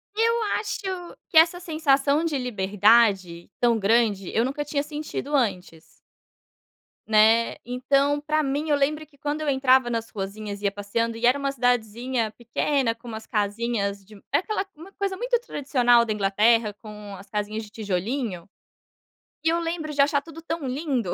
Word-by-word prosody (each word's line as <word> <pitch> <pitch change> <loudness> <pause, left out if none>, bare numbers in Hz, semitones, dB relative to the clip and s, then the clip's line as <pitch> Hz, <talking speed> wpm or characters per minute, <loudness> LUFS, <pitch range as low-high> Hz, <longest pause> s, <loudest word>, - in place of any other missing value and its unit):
Eu 460 +1 +2 0.2
acho 420 0 -4 0.5
que - - +1
essa 335 +2 +6
sensação 300 -3 +1
de 310 -4 0
liberdade 205 -5 +2
tão 235 -2 +3
grande, 210 -2 +1
eu 225 - +3
nunca 280 +4 -2
tinha 285 0 -1
sentido 295 -1 -4
antes. 185 - -1 1.3
Né, 220 +1 +4
então 275 +4 +1
para 310 +1 0
mim, 290 +3 -2
eu 295 - +4
lembro 300 +2 0
que 290 -1 -26
quando 295 +2 -3
eu 305 - -1
entrava 260 -2 +4
nas 230 -1 -3
ruazinhas, 200 +1 -6
ia 200 -1 +1
passeando 225 +3 -2
e 235 - -1
era 255 +4 +4
uma 280 0 -1
cidadezinha 245 -2 0
pequena, 240 +2 -1
com 230 +2 -16
umas 220 -1 -7
casinhas 205 -1 -2
de 210 +2 -15 0.2
é - - +4
aquela, 425 +2 -2
uma 330 +6 -13
coisa 395 -1 -3
muito 485 +2 +1
tradicional 250 - +2
da 220 - -1
Inglaterra, 210 +2 +2
com 210 -2 -9
as 195 +1 -13
casinhas 210 +1 -3
de 210 - -12
tijolinho, 205 -1 -3 1.0
e 320 - +3
eu 335 +1 +1
lembro 330 -2 -3
de 285 - +3
achar 285 0 +3
tudo 330 +2 -11
tão 330 -4 -4
lindo. 255 - -2
245 Hz, 165 wpm, -25 LUFS, 215-290 Hz, 1.3 s, essa